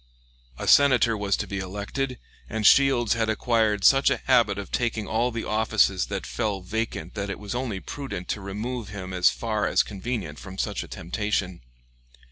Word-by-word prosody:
A - - -5
Senator 125 -5 +5
was 100 -2 0
to - - -3
be 100 - -4
elected, 105 +8 -4 0.3
and 110 0 -2
Shields 130 -4 +5
had 115 -1 0
acquired 110 -2 +1
such 135 +5 +6
a - - +1
habit 115 -6 +3
of 100 -2 -7
taking 115 -3 -1
all 115 +4 0
the 115 -2 -4
offices 105 -3 +2
that 100 -2 -4
fell 105 -5 -2
vacant 90 -4 -4
that 100 -2 -4
it 100 - -4
was 105 +1 -6
only 120 -5 -3
prudent 130 -7 -6
to 105 - -2
remove 110 +4 -5
him 95 -2 -7
as 90 -1 +4
far 110 -3 -1
as - - +3
convenient 100 -6 -5
from 95 -1 -10
such - - -2
a - - -8
temptation. 95 0 -3
105 Hz, 180 wpm, -25 LUFS, 100-120 Hz, 0.3 s, such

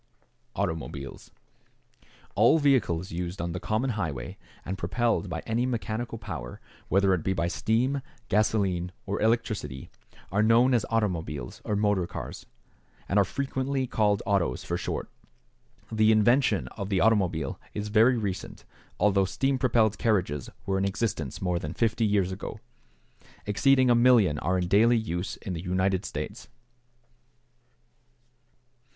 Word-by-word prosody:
=Automobiles.= 80 -7 -4 1.0
All 115 +9 +5
vehicles 120 - +1
used 90 +2 -4
on 85 +1 -2
the 90 - -4
common 110 +6 -1
highway, 80 - -4 0.3
and 95 - -3
propelled 100 +3 0
by 80 -1 -4
any 120 +3 0
mechanical 120 -1 -3
power, 85 - -7 0.3
whether 95 0 +3
it 90 - 0
be 95 - 0
by 85 -2 0
steam, 120 +9 0 0.3
gasoline, 100 -4 +1
or 100 0 -3
electricity, 110 - -1 0.4
are 100 +3 +2
known 115 +4 +5
as 115 -4 +1
automobiles 85 - -2
or 105 - -1
motor 100 -4 +1
cars, - - -7 0.6
and 100 - +2
are - - +6
frequently 135 +3 -2
called 105 -4 +1
"autos" 95 - 0
for 85 - -2
short. - - -3 0.8
The 110 0 +4
invention 120 +5 +3
of 100 -2 -6
the 95 -3 +1
automobile 90 -10 +1 0.2
is 105 0 -3
very 115 +4 +5
recent, 100 -4 -5 0.3
although 100 -2 +3
steam 135 +7 0
propelled 110 -4 +2
carriages 90 - 0 0.2
were 95 -1 0
in 95 - +1
existence 100 - -2
more 90 -1 0
than 75 0 -6
50 115 0 +1
years 100 -3 +1
ago. 95 - -6 0.9
Exceeding 130 +5 +4
a - - +7
million 120 -10 +4
are 95 +2 0
in 90 -1 -1
daily 115 +6 +5
use 90 -5 -3
in 95 - -6
the 85 - -4
United 95 +1 0
States. - - -6
100 Hz, 140 wpm, -27 LUFS, 90-115 Hz, 1.0 s, a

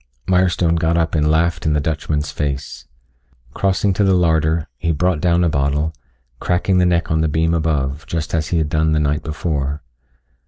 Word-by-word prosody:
Mirestone 90 -2 +2
got 80 +1 +1
up 85 -1 0
and 75 -1 +2
laughed 80 +1 +1
in 75 - +1
the 75 - +2
Dutchman's 75 0 -2
face. 70 -3 -4 0.7
Crossing 95 0 +1
to 100 - +1
the 95 -1 +3
larder, 80 -2 +1
he 85 +5 -1
brought 85 0 0
down 85 0 +2
a - - +3
bottle, 75 +2 0 0.5
cracking 90 +1 +1
the 90 - +3
neck 85 -1 0
on 80 0 +2
the 80 - +2
beam 80 +2 +1
above, 75 -3 -1
just 80 -2 -4
as 80 -2 0
he 85 - -1
had 80 -2 0
done 80 +1 +1
the 75 - +2
night 75 0 0
before. 75 -2 -3
80 Hz, 190 wpm, -19 LUFS, 75-85 Hz, 0.7 s, the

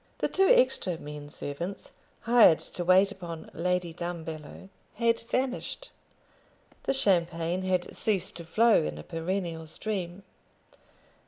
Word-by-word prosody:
The - - 0
two 385 0 +3
extra - - +3
men 150 -1 -8
servants, 170 +7 -5 0.3
hired 230 -9 +6
to 175 - -6
wait 185 +3 +5
upon 170 -5 -8
Lady 180 0 -1
Dumbello, 165 0 -7 0.3
had 230 +1 +2
vanished. 255 - -3 0.9
The - - +2
champagne 170 -5 +1
had 185 -1 -1
ceased 205 -4 0
to 170 - -7
flow 220 +7 +4
in 75 0 -4
a 75 - -8
perennial 165 - -3
stream. 185 +1 -4
180 Hz, 120 wpm, -28 LUFS, 165-205 Hz, 0.9 s, hired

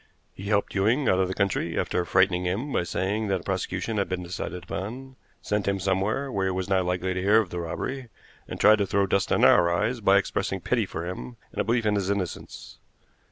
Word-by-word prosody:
He 95 - -9
helped 100 0 0
Ewing 115 +7 +2
out 95 - +3
of 95 - +2
the 95 - -4
country, 95 -4 -1
after 90 - 0
frightening 95 -1 +2
him 115 +11 -2
by - - +2
saying 100 +5 -2
that 95 -3 0
a - - -17
prosecution 95 +3 -2
had 100 - 0
been 95 -1 -3
decided 90 0 -5
upon; 115 +10 -6 0.3
sent 105 -1 -1
him 100 0 +1
somewhere 100 +8 0
where 95 -3 0
he - - 0
was 95 0 -3
not 95 -2 +2
likely 90 +1 -1
to 90 - -2
hear 105 +4 +5
of 105 -5 -2
the 90 - -3
robbery, 125 +9 -4 0.4
and - - -7
tried 110 0 +6
to 100 - +1
throw 100 +1 +2
dust 100 0 0
in - - +4
our 85 -1 +5
eyes 110 +7 0
by 100 -1 +5
expressing 100 - -1
pity - - 0
for 80 +2 -5
him 65 -9 -6
and - - -2
a - - 0
belief 115 +1 0
in 105 - +2
his 100 -2 -1
innocence." 100 -3 -4
95 Hz, 230 wpm, -26 LUFS, 90-105 Hz, 0.4 s, tried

